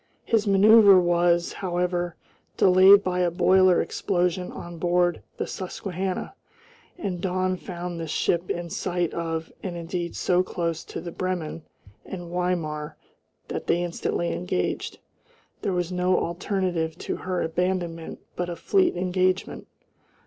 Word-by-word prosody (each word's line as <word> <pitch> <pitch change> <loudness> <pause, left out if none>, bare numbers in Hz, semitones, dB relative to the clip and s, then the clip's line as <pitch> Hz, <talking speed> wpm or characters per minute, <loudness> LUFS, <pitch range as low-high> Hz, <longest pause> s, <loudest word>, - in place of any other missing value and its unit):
His 220 -2 +1
manoeuvre 200 0 +7
was, 175 0 +2
however, 175 -2 -2 0.4
delayed 190 +2 +7
by 180 -1 -1
a 180 -1 +3
boiler 185 +1 +4
explosion 180 -1 -1
on 170 -1 -8
board 175 0 +1 0.2
the - - -2
Susquehanna, 185 0 -4 0.6
and 185 - -4
dawn 185 0 0
found 175 -2 -6
this 165 -1 -5
ship 170 +3 0
in 170 -1 -3
sight 175 -2 -1
of 165 -1 -3
and 180 -3 -5
indeed 170 0 -4
so 180 0 +2
close 170 -3 -3
to - - -6
the 170 0 -6
Bremen 175 -3 -3 0.4
and 175 -2 -8
Weimar 165 -4 -2 0.5
that - - -5
they 175 +1 +2
instantly 170 0 -2
engaged. 90 0 -2 0.6
There 200 - -1
was 180 -1 -1
no 180 0 +2
alternative 175 -2 -1
to - - -4
her 185 -1 -2
abandonment 170 -1 -2
but 175 0 -2
a 175 - -4
fleet 370 - +2
engagement. 185 +1 0
180 Hz, 135 wpm, -25 LUFS, 170-185 Hz, 0.6 s, manoeuvre